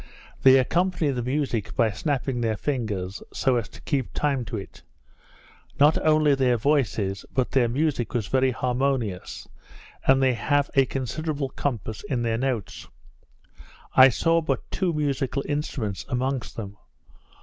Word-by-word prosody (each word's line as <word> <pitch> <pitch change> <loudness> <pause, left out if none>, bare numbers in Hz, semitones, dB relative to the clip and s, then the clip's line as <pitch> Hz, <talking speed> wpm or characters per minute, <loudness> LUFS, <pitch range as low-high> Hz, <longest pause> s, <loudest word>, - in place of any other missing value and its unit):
They 130 0 +7
accompany 170 +3 +1
the 125 -2 -2
music 125 -4 -2
by 115 -2 +3
snapping 130 +3 -2
their 110 -2 0
fingers, 105 -9 -3
so 130 -2 +1
as 115 -4 -3
to - - -14
keep 135 -5 -1
time 140 -4 0
to 115 - -5
it. 95 - -9 1.0
Not 145 +2 +6
only 155 -2 +4
their 130 -3 +2
voices, 110 -7 0
but 130 -2 0
their 125 -3 +3
music 135 -2 -1
was 115 -4 0
very 130 +5 +2
harmonious, 125 -5 -2 0.6
and 135 0 +6
they 130 -1 +3
have 145 +4 0
a 135 -1 +4
considerable 140 +2 -3
compass 110 -7 -4
in 120 -3 0
their 115 -1 0
notes. 125 -7 -3 1.1
I 130 0 +9
saw 165 +6 +2
but 160 - -3
two 185 -3 0
musical 140 -3 -1
instruments 120 - -3
amongst 130 +1 -2
them. 100 -2 -7
130 Hz, 145 wpm, -25 LUFS, 115-145 Hz, 1.1 s, I